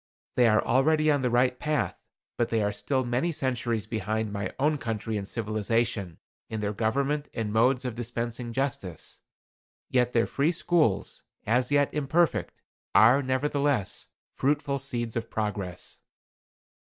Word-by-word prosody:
They 125 -1 +5
are 110 -1 +3
already 155 +5 +3
on 145 -2 +2
the 125 - +1
right 125 +1 +2
path, 150 0 -1 0.3
but 120 - 0
they 110 -2 +1
are 105 - +1
still 130 +5 -1
many 125 +8 0
centuries 120 -6 -1
behind 110 -1 -2
my 100 0 -3
own 150 +2 +1
country 110 -1 -3
in 100 -2 -3
civilization, 110 -4 -1 0.3
in 110 - -3
their 105 0 -1
government 140 +7 0
and 110 -3 -2
modes 125 +4 +3
of 125 - -2
dispensing 120 0 -4
justice. 115 - -3 0.7
Yet 125 -1 +3
their 115 -1 +3
free 150 +5 +1
schools, 155 - +1 0.2
as 125 +4 +2
yet 145 -1 +3
imperfect, 155 +4 0 0.3
are, 115 +7 +7
nevertheless, 140 -3 0 0.3
fruitful 140 0 0
seeds 120 -4 -4
of 115 -1 -3
progress." 100 -4 -4
120 Hz, 140 wpm, -27 LUFS, 110-140 Hz, 0.7 s, are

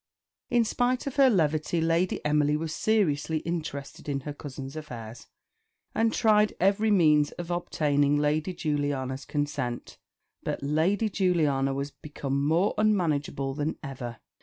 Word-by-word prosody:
In 240 -3 +3
spite 245 +3 0
of 275 0 -5
her 270 -2 +7
levity 160 -4 +1
Lady 165 +2 0
Emily 150 0 +2
was 160 0 -4
seriously 160 -8 +1
interested 155 -4 -5
in 140 -1 -1
her 145 +2 -6
cousin's 140 -1 -8
affairs, 120 -7 -8 0.7
and 225 0 +2
tried 215 -2 +3
every 200 +4 +3
means 150 -7 +4
of 175 0 -6
obtaining 145 -4 +1
Lady 150 +4 +1
Juliana's 145 -5 -2
consent; 145 -5 -3 0.4
but - - -4
Lady 165 +9 +1
Juliana 155 -9 +1
was 140 +1 -3
become 140 -2 -3
more 165 +7 +2
unmanageable 155 -10 +1
than 150 +2 -2
ever. 125 -5 -6
150 Hz, 135 wpm, -27 LUFS, 140-185 Hz, 0.7 s, her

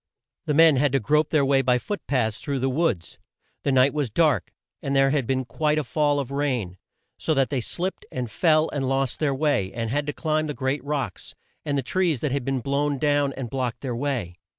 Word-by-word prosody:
The 150 - +1
men 160 -2 +6
had 140 0 +2
to 135 - +3
grope 150 +7 +2
their 150 -3 +3
way 135 0 +3
by 125 -1 +3
foot 205 - -4
paths 115 -6 0
through 140 -2 -3
the 130 +1 0
woods. 125 - -1 0.4
The 140 - 0
night 130 +1 +4
was 145 -5 -1
dark 145 - +2 0.3
and 140 0 -2
there 135 0 +4
had 140 -5 0
been 130 -1 0
quite 150 +3 0
a 155 - +1
fall 145 +2 +1
of 135 -2 -4
rain, 125 -11 -2 0.4
so 160 - 0
that 135 0 +1
they 135 -3 0
slipped 180 +10 -4
and 125 -1 -3
fell, 155 +5 +3
and 135 -2 -2
lost 135 -1 0
their 145 -3 +1
way, 135 -10 +1
and 115 -1 -3
had 145 +2 -1
to - - 0
climb 155 0 -1
the 150 - -4
great 135 +1 -2
rocks, 140 - -4 0.3
and 145 -1 0
the 135 - -1
trees 170 -1 0
that 150 - -1
had 140 -1 -1
been 135 0 -1
blown 140 +2 0
down 145 0 +2
and 130 -4 -6
blocked 125 -3 -2
their 125 -4 -3
way. 120 -10 -3
140 Hz, 225 wpm, -24 LUFS, 130-150 Hz, 0.4 s, men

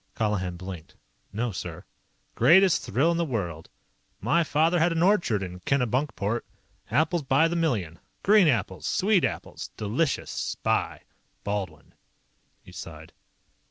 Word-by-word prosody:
Colihan 95 -5 -1
blinked. 90 -3 -9 0.4
"No, 115 +4 -2
sir." 90 - -7 0.5
"Greatest 175 +9 +5
thrill 140 +11 +2
in 170 - 0
the 170 - +1
world. 90 - -4 0.5
My 170 0 +2
father 160 +3 +2
had 170 +2 +3
an 165 0 +1
orchard 175 - +2
in 90 -1 -7
Kennebunkport. 120 - 0 0.5
Apples 160 +3 +1
by 140 +4 +3
the 170 - -2
million. 110 - -1 0.2
Green 205 -3 +6
apples. 100 - 0
Sweet 200 -1 +2
apples. - - -4
Delicious. 130 +9 -1
Spy. - - -2 0.4
Baldwin." 95 -6 -4 0.7
He - - -14
sighed. 80 -1 -10
125 Hz, 125 wpm, -26 LUFS, -, 0.7 s, Green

